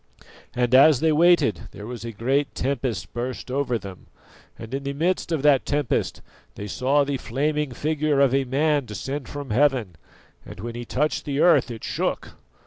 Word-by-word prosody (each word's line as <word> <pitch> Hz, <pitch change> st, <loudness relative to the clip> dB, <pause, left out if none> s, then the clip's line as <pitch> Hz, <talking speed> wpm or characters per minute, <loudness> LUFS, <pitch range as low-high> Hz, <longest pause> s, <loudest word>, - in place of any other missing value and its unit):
And 125 Hz, 0 st, 0 dB
as 135 Hz, +1 st, +7 dB
they 160 Hz, +2 st, +2 dB
waited 155 Hz, -, +3 dB
there 105 Hz, -, -9 dB
a 120 Hz, -1 st, -6 dB
great 135 Hz, +6 st, -1 dB
tempest 130 Hz, -3 st, -2 dB
burst 125 Hz, +2 st, -5 dB
over 130 Hz, -3 st, 0 dB
them, 95 Hz, -4 st, -11 dB, 0.5 s
and 115 Hz, +3 st, -9 dB
in 135 Hz, -, -2 dB
the 140 Hz, 0 st, -3 dB
midst 170 Hz, +4 st, -1 dB
of 155 Hz, -4 st, -1 dB
that 145 Hz, -3 st, +4 dB
tempest 145 Hz, -4 st, -1 dB, 0.3 s
they 100 Hz, -, -6 dB
saw 135 Hz, +7 st, +1 dB
the 140 Hz, -1 st, -2 dB
flaming 150 Hz, +3 st, -1 dB
figure 150 Hz, +1 st, 0 dB
of 135 Hz, -2 st, +4 dB
a 135 Hz, 0 st, +2 dB
man 145 Hz, +2 st, +1 dB
descend 135 Hz, +5 st, -5 dB
from 145 Hz, -3 st, -6 dB
heaven, 125 Hz, -, +1 dB, 0.5 s
and -, -, -11 dB
when 115 Hz, +3 st, -5 dB
he 120 Hz, 0 st, -6 dB
touched 150 Hz, +6 st, -1 dB
the 140 Hz, -1 st, -2 dB
earth 170 Hz, -5 st, +4 dB
it 115 Hz, -2 st, -8 dB
shook. -, -, -2 dB
135 Hz, 175 wpm, -24 LUFS, 120-145 Hz, 0.5 s, as